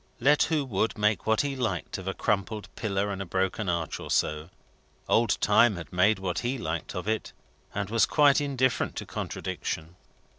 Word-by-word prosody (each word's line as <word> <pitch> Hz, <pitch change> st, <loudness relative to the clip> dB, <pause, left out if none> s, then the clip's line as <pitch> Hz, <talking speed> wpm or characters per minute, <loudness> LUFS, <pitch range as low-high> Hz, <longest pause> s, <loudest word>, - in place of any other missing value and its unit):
Let 145 Hz, +4 st, +4 dB
who 155 Hz, -4 st, 0 dB
would 110 Hz, -2 st, -1 dB
make 105 Hz, -1 st, +1 dB
what 110 Hz, 0 st, +3 dB
he 140 Hz, -1 st, -2 dB
liked 105 Hz, -9 st, -2 dB
of 95 Hz, -, -9 dB
a 95 Hz, -, -2 dB
crumbled 105 Hz, +1 st, -2 dB
pillar 100 Hz, -1 st, -1 dB
and 100 Hz, -1 st, -4 dB
a -, -, -4 dB
broken 95 Hz, +2 st, -1 dB
arch 85 Hz, -3 st, -2 dB
or -, -, -8 dB
so. 75 Hz, +2 st, 0 dB, 0.6 s
Old 115 Hz, -2 st, +3 dB
Time 105 Hz, +1 st, +5 dB
had 85 Hz, -2 st, -9 dB
made 95 Hz, +5 st, +4 dB
what 95 Hz, -3 st, -2 dB
he 125 Hz, +2 st, -2 dB
liked 85 Hz, -5 st, -4 dB
of 90 Hz, +2 st, -4 dB
it, 110 Hz, 0 st, -2 dB, 0.4 s
and 105 Hz, -1 st, -1 dB
was 115 Hz, -1 st, +4 dB
quite 145 Hz, -1 st, +5 dB
indifferent 130 Hz, -3 st, 0 dB
to -, -, -5 dB
contradiction. 80 Hz, +2 st, -4 dB
105 Hz, 185 wpm, -27 LUFS, 90-120 Hz, 0.6 s, Time